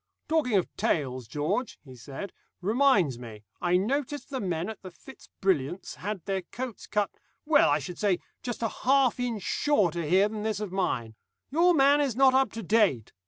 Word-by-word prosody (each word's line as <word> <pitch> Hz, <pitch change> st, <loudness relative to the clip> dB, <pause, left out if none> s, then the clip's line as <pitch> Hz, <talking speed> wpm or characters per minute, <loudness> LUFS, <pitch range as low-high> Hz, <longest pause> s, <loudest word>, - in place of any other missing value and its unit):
"Talking 310 Hz, -8 st, +1 dB
of 185 Hz, -, +1 dB
tails, 130 Hz, -6 st, -1 dB
George," 155 Hz, -, -2 dB
he 130 Hz, -2 st, -12 dB
said, 140 Hz, +10 st, -8 dB, 0.3 s
"reminds 200 Hz, -, +2 dB
me. 110 Hz, -3 st, -10 dB, 0.2 s
I 175 Hz, 0 st, +3 dB
noticed 275 Hz, +8 st, -2 dB
the 265 Hz, -, -2 dB
men 175 Hz, -4 st, -2 dB
at 220 Hz, -1 st, -7 dB
the 185 Hz, -, -8 dB
Fitz 225 Hz, +7 st, -15 dB
Brilliants' 180 Hz, -3 st, 0 dB
had 200 Hz, -2 st, -5 dB
their 195 Hz, -1 st, -1 dB
coats 245 Hz, +6 st, -7 dB
cut 210 Hz, -1 st, 0 dB, 0.3 s
well, 295 Hz, -1 st, +5 dB
I 145 Hz, -, +3 dB
should 155 Hz, +4 st, -7 dB
say, 200 Hz, -4 st, +2 dB, 0.2 s
just 240 Hz, -2 st, -4 dB
a 225 Hz, -, +1 dB
half 265 Hz, +1 st, +2 dB
inch 235 Hz, -5 st, -2 dB
shorter 195 Hz, -, +1 dB
here 185 Hz, +6 st, +3 dB
than 210 Hz, 0 st, -5 dB
this 215 Hz, -1 st, -2 dB
of 210 Hz, -3 st, -4 dB
mine. 130 Hz, -12 st, -1 dB, 0.4 s
Your 345 Hz, +4 st, +4 dB
man 285 Hz, +1 st, +5 dB
is 270 Hz, -6 st, 0 dB
not 265 Hz, 0 st, +5 dB
up 265 Hz, 0 st, +3 dB
to 225 Hz, -, -6 dB
date. 195 Hz, -, +2 dB
205 Hz, 185 wpm, -28 LUFS, 170-255 Hz, 0.4 s, well